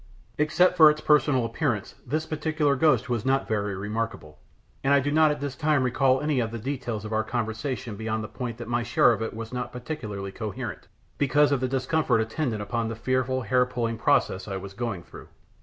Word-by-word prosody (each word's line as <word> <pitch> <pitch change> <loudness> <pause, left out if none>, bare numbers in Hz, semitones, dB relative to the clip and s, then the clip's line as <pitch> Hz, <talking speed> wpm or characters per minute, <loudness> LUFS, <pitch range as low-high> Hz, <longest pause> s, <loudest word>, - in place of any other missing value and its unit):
Except 160 +5 +3
for 155 -2 +9
its 150 0 0
personal 145 -5 +3
appearance, 115 -5 -2
this 155 +5 -1
particular 155 -2 0
ghost 135 -4 +3
was 120 -4 -1
not 135 +1 +1
very 105 -2 -1
remarkable, 105 -7 -4 0.4
and 140 +1 +4
I - - +5
do 145 +2 -1
not 155 +1 +5
at 150 0 -1
this 140 -2 -3
time 150 -1 +2
recall 130 +1 +2
any 150 -3 +1
of 115 -2 0
the 115 - -5
details 120 -3 -4
of 110 - -5
our 110 0 +1
conversation 115 +1 -3
beyond 110 +1 -3
the - - -5
point 120 -1 -5
that 120 -2 -7
my 120 0 0
share 120 +1 +4
of 115 - -1
it 115 - -3
was 115 +1 -7
not 125 -1 -3
particularly 110 -7 -5
coherent, 110 +1 -6 0.3
because 145 +1 +3
of 140 - +2
the 130 - 0
discomfort 130 -1 +1
attendant 110 -1 -2
upon 115 +2 -2
the 115 - -4
fearful 130 +2 0
hair 125 +3 +3
pulling 115 -2 -2
process 95 -3 +1
I 95 -2 -3
was 95 +1 -8
going 110 -5 -4
through. - - -13
125 Hz, 205 wpm, -26 LUFS, 110-140 Hz, 0.4 s, for